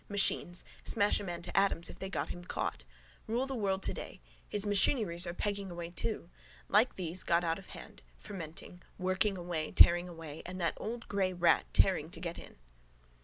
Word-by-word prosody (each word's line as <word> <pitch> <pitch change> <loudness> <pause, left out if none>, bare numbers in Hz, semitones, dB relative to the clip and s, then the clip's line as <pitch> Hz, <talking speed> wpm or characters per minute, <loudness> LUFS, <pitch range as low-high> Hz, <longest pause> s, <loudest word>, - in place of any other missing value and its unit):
Machines. 195 -3 +2 0.2
Smash 205 -2 +3
a - - -6
man 175 -3 -5
to 175 - -5
atoms 195 -4 +3
if - - -10
they 190 - -4
got - - -2
him 175 - -7
caught. 175 - -3 0.4
Rule 240 +4 0
the 270 - -4
world 195 -5 -1
today. - - -2 0.3
His 205 0 +2
machineries 200 -4 +3
are 170 - -3
pegging 200 -1 -2
away 170 -1 -6
too. 175 -1 -3 0.4
Like 215 +5 +3
these, 180 0 -2
got 170 +1 +2
out 165 +1 0
of 195 - -13
hand: - - -11 0.2
fermenting. 180 -2 -9 0.2
Working 185 +2 +1
away, 170 -3 -3
tearing 175 +1 +6
away. 160 -3 -8
And 185 +1 -7
that 170 -2 +1
old 235 +2 -5
grey 190 -2 0
rat 175 -2 +3
tearing 180 -5 +3
to 170 - -7
get 170 0 -5
in. - - -12
185 Hz, 185 wpm, -32 LUFS, 170-200 Hz, 0.4 s, tearing